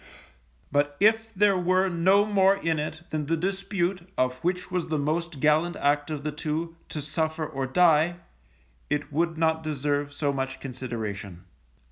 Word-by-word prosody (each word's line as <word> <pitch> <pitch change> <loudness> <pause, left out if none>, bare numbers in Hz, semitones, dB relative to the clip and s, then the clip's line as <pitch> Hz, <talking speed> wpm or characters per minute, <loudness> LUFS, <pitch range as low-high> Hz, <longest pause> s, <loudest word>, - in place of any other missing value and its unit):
But 145 0 +1
if 225 +2 +3
there 200 0 +4
were 185 +1 +2
no 190 +3 +4
more 195 -2 +4
in 165 -5 -1
it 160 +2 -5
than 150 -2 -2
the 165 +1 +1
dispute 190 0 -2
of 130 0 +1
which 180 +4 -2
was 180 -2 -1
the 155 - -1
most 155 +1 -2
gallant 155 +4 +3
act 145 +1 +1
of 150 -2 -4
the 150 - -2
two, 155 +3 -3
to 150 - -4
suffer, 160 +1 -1
or 135 -3 -3
die, 165 +2 +4 0.7
it 150 0 -2
would 165 +2 0
not 160 0 +2
deserve 145 -1 -1
so 145 0 -1
much 135 -1 -3
consideration. 110 -8 -6
160 Hz, 160 wpm, -26 LUFS, 145-180 Hz, 0.7 s, there